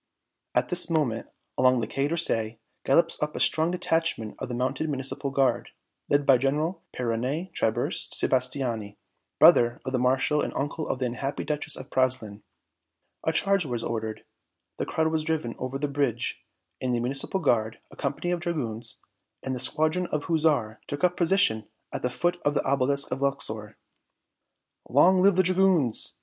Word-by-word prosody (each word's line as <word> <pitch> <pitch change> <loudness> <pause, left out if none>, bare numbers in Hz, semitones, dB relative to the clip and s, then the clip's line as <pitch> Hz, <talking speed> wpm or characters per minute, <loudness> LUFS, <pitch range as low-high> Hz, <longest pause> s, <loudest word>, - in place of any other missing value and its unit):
At 125 0 +2
this 180 0 +4
moment, 145 -9 0 0.3
along 130 -1 +4
the - - -1
Quai 135 +1 -1
d'Orsay, 115 -9 0 0.3
gallops 165 +5 +3
up 150 0 -2
a - - -3
strong 160 +1 +2
detachment 165 -10 0
of - - -5
the 120 - -3
mounted 130 +5 -1
Municipal 135 0 -1
Guard, 135 -3 +1 0.4
led 145 0 +2
by 130 -3 +5
General 150 +7 -1
Peyronet 130 +9 -2
Tiburce 110 - -1
Sebastiani, 125 -5 0 0.4
brother 120 0 +6
of 130 - -4
the 130 - +1
Marshal 130 +4 +2
and - - -3
uncle 145 +3 -3
of - - -1
the 130 - -1
unhappy 125 +3 -3
Duchess 150 0 -2
of 130 - -10
Praslin. 125 -6 0 0.8
A 160 - +3
charge 195 +3 +2
was 120 -5 -4
ordered, 110 -1 -4 0.5
the - - -3
crowd 160 0 +1
was 160 -1 0
driven 155 -7 -2
over 130 +1 -3
the 145 +1 -1
bridge, 140 -5 -2 0.4
and 125 -1 0
the - - 0
Municipal 135 +9 -1
Guard, 110 -8 +1
a - - -13
company 175 +4 -2
of 175 - 0
dragoons 120 - -4 0.5
and 130 -1 -2
a - - -4
squadron 155 +7 0
of 150 -3 -2
hussars 150 -10 +1
took 145 +4 -5
up 180 -1 +4
a - - -23
position 170 - +2 0.3
at - - -3
the 125 - 0
foot 175 +8 -1
of 145 0 +1
the - - +1
Obelisk 140 +1 +2
of 135 - -3
Luxor. 110 -6 -2 1.1
"Long 180 +8 +5
live 195 0 +5
the 185 - +4
dragoons!" 185 - +2
135 Hz, 170 wpm, -26 LUFS, 120-160 Hz, 1.1 s, brother